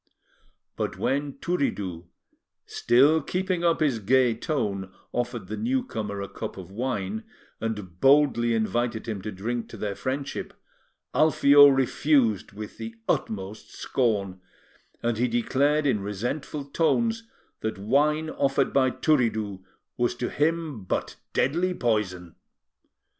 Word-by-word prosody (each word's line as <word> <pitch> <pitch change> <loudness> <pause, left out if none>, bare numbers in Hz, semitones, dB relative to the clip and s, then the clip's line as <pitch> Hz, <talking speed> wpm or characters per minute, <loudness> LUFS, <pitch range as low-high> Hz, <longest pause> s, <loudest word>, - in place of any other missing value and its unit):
But - - -2
when 140 +1 -1
Turiddu, 100 - -2 0.6
still 145 +6 +4
keeping 185 +2 -1
up 170 -1 +2
his 140 -7 +2
gay 125 +3 +3
tone, 105 - -2 0.2
offered 120 -3 -2
the 105 +4 -5
newcomer 120 - -2
a - - -5
cup - - -7
of 95 -1 -9
wine, 110 -2 -3 0.4
and 105 -6 -5
boldly 135 -4 +4
invited 115 +1 -1
him 105 -4 -3
to 105 +2 -5
drink 115 +5 -4
to - - -9
their 105 -1 -2
friendship, 135 +6 -4 0.6
Alfio 145 -2 +7
refused 135 -4 +2
with 105 +2 -9
the 115 0 -6
utmost 100 0 -3
scorn, 100 -7 -1 0.6
and 115 -1 0
he 125 - +3
declared 140 +6 +1
in 130 -7 +2
resentful 120 +9 -4
tones 225 +10 0 0.3
that 110 -1 -3
wine 150 +9 +2
offered 135 0 +1
by 130 -1 +4
Turiddu 110 - 0 0.3
was 120 0 +1
to 120 0 -3
him 155 - -1
but 90 - -3 0.2
deadly 175 +7 +1
poison. 95 - -1
120 Hz, 125 wpm, -26 LUFS, 105-145 Hz, 0.6 s, Alfio